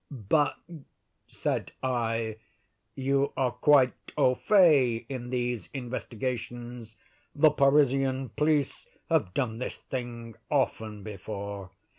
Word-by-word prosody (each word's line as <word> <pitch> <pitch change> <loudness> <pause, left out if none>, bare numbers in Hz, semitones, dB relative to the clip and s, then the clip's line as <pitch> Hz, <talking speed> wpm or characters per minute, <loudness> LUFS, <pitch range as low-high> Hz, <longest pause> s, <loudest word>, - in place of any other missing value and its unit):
"But," 145 +3 +1 0.7
said - - -3
I, 115 -3 -1 0.6
"you 135 +1 +1
are 130 -2 +2
quite 130 +1 +4 0.2
au 125 - +4
fait 135 - +4
in 125 -3 -5
these 120 -6 -2
investigations. 120 -2 -5 0.4
The 150 +1 +6
Parisian 135 -2 +3
police 150 -1 0 0.2
have 90 - +1
done 115 -4 -1
this 130 - -4
thing 120 -3 -6 0.2
often 105 -2 -1
before." 100 -1 -6
125 Hz, 100 wpm, -28 LUFS, 115-135 Hz, 0.7 s, The